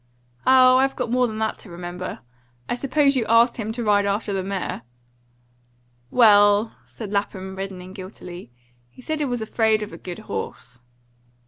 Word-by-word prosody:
"Oh, 255 -1 +7
I've 270 +1 +2
got 230 - -3
more 250 0 +3
than 215 -1 -6
that 220 0 -2
to 205 - -13
remember. 175 -2 -6 0.5
I - - -1
suppose 275 +3 +2
you 250 - +1
asked 230 +2 +4
him 220 -2 -3
to 240 +1 -4
ride 205 -2 +3
after 200 +1 -1
the 195 - -1
mare?" 190 -8 -4 1.3
"Well," 205 - +5
said 215 -4 -8
Lapham, 190 -2 -3
reddening 190 -1 -7
guiltily, 180 - -10 0.4
"he - - -21
said 315 +2 -2
he 295 - 0
was 245 -4 -2
afraid 220 -1 +1
of 210 - -8
a - - -9
good 180 -1 -7
horse." 120 +1 -6
210 Hz, 165 wpm, -23 LUFS, 190-240 Hz, 1.3 s, Oh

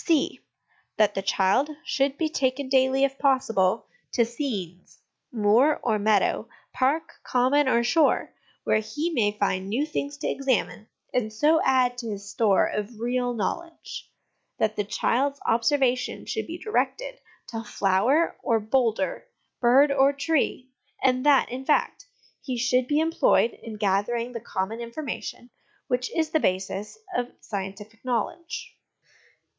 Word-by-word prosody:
(c) 320 -5 +1 0.6
That 210 -1 +4
the 195 - -2
child 195 +8 +2 0.2
should 275 0 0
be 320 - +1
taken 270 -3 -1
daily, 265 0 +3
if 275 0 0
possible, 225 -8 +2 0.3
to 235 - +3
scenes 210 - -5 0.3
moor 235 +6 +3
or 220 -3 +1
meadow, 205 -1 +2 0.2
park, 275 +5 0
common, 260 +3 +2
or 235 -1 +3
shore 310 +7 +2 0.3
where - - +2
he 295 +11 -3
may 220 -9 +2
find 195 -2 -1
new 255 +8 0
things 285 -2 -4
to 290 - -3
examine, 260 -5 -1 0.3
and 225 -4 0
so 300 +9 +3
add 255 -2 +2
to 230 -2 -5
his 200 -1 -6
store 200 -1 +3
of 210 +2 -4
real 245 +1 -1
knowledge. 335 - -5 0.5
That 215 0 0
the 205 - 0
child's 275 +7 0
observation 250 +2 +1
should 440 - -3
be 335 +2 -6
directed - - -2 0.3
to 225 -1 -5
flower 235 - +2
or 230 -3 +2
boulder, 240 - 0 0.3
bird 265 +4 +5
or 275 0 +4
tree; 275 -3 -1 0.3
that, 265 +2 +4
in 255 +2 -5
fact, 300 - 0 0.3
he 255 -3 -4
should 250 +1 +2
be 295 +2 +2
employed 320 -7 +3
in 225 -1 -10
gathering 210 +4 0
the 235 - -5
common 205 +1 -3
information 240 -1 -6 0.4
which 250 0 -1
is 320 -2 0
the 315 - +3
basis 190 - -2 0.2
of 245 0 -1
scientific 205 +2 -7
knowledge. 320 - -3
250 Hz, 140 wpm, -25 LUFS, 215-280 Hz, 0.6 s, bird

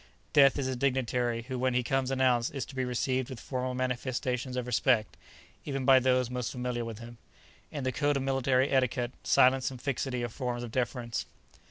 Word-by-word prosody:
Death 140 -1 +6
is 140 - -1
a 130 - -2
dignitary 125 -2 0
who 130 +1 -5
when 130 0 +1
he 125 - +2
comes 130 +1 0
announced 130 -2 +1
is 135 - -2
to - - -12
be 130 -1 -1
received 130 +1 -1
with 130 -4 -7
formal 130 -1 -3
manifestations 125 0 -2
of 125 - -2
respect, 120 -2 +1 0.5
even 135 -3 -3
by 135 -1 +7
those 130 -1 +2
most 125 -1 -3
familiar 125 -1 -3
with 115 -2 -6
him. 115 0 -11 0.5
In 145 -3 -5
the 130 - 0
code 145 +3 +1
of 135 - -2
military 135 0 +1
etiquette 130 -2 +1
silence 130 0 +4
and 130 -2 -9
fixity 130 -2 -2
are 120 - -2
forms 120 0 -4
of 120 - -6
deference. 120 -1 -2
130 Hz, 195 wpm, -29 LUFS, 120-130 Hz, 0.5 s, by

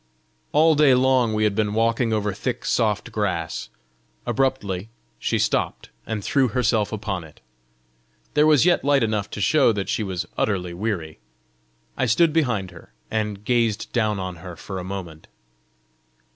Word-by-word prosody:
All 160 +2 +5
day 145 -3 +5
long 130 -2 +3
we 110 0 0
had 105 -1 +2
been 105 0 0
walking 115 +1 +1
over 105 -2 0
thick 120 +4 -4
soft 110 -1 0
grass: 90 -7 -2 0.6
abruptly 110 -8 -1 0.3
she - - 0
stopped, - - -1 0.2
and 105 -2 -3
threw 135 +3 +2
herself 115 -3 +1
upon 100 -5 -3
it. 80 -2 -15 0.9
There 150 +1 +4
was 150 0 +5
yet 175 -1 +3
light 140 -2 +3
enough 105 -3 -1
to - - -6
show 135 +5 +4
that 100 -2 -3
she - - 0
was 95 -4 -3
utterly 90 -4 0
weary. 85 - -3 0.8
I - - 0
stood 155 +8 +3
behind 115 - 0
her, 85 - -15 0.2
and 105 -2 -2
gazed 115 -3 +1
down 110 -4 +1
on 95 -2 -5
her 90 +1 -9
for 95 +2 -6
a - - -5
moment. 90 -4 -7
110 Hz, 160 wpm, -23 LUFS, 95-125 Hz, 0.9 s, All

